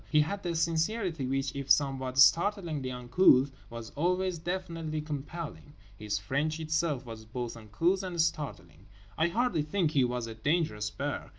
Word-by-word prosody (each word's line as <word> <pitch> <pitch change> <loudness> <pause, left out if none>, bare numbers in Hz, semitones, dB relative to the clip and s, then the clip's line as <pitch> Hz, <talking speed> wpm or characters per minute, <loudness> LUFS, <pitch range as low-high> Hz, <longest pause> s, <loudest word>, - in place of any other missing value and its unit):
He 150 - +5
had 200 +7 -2
a 170 - -1
sincerity 165 - 0
which, 135 0 -1
if 140 -1 -5
somewhat 135 -2 +2
startlingly 165 -2 +4
uncouth, 125 +2 +4 0.2
was 115 -1 -8
always 180 +2 0
definitely 165 -3 -3
compelling. 150 0 -6 0.2
His 105 0 -2
French 145 +10 -1
itself 155 -4 -1
was 115 -2 -8
both 120 +2 -5
uncouth 140 - 0
and 180 -3 -5
startling. 155 -3 -2 0.3
I 160 - +2
hardly 210 -3 +1
think 155 +2 0
he 140 -4 +3
was 125 -1 -1
a 115 - -6
dangerous 110 -4 0
bear. - - -4
150 Hz, 155 wpm, -30 LUFS, 130-170 Hz, 0.3 s, He